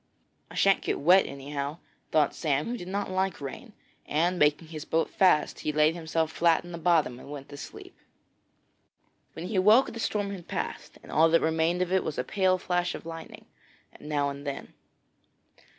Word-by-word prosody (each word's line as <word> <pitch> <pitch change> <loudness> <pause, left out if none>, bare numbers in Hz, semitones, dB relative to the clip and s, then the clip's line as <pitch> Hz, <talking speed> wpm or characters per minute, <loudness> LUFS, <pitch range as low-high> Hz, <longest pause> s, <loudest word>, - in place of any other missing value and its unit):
'I - - -12
shan't 195 -1 +4
get - - -2
wet, 180 +6 +5
anyhow,' 140 +2 -5 0.3
thought 150 -2 +3
Sam, 145 -2 0
who 240 - -3
did 180 -7 -8
not 200 0 -3
like 190 -1 -1
rain, 140 -2 -8 0.3
and, 175 +4 +1
making 150 +2 +2
his 155 -2 -6
boat 165 0 0
fast, 180 -6 +3
he 150 - -2
laid 150 +1 +3
himself 160 -1 -1
flat 170 -1 +3
in 175 - -10
the 170 - -6
bottom 160 -7 +2
and 140 - -12
went 140 -2 -8
to 145 - -9
sleep. - - -10 1.4
When 165 - -7
he 195 +2 -2
awoke 215 +8 +5
the 230 - -7
storm 205 -3 -1
had 185 -4 -8
passed, - - -5
and - - -12
all 160 +2 +5
that 165 +1 +4
remained 160 +3 +1
of 180 - -5
it 190 - +3
was 155 - -4
a 125 - 0
pale 185 +4 +2
flash 180 -1 -1
of - - -9
lightning 165 -1 -9 0.5
now 145 -1 -1
and 140 0 -9
then. 140 -1 -6
165 Hz, 190 wpm, -28 LUFS, 150-185 Hz, 1.4 s, wet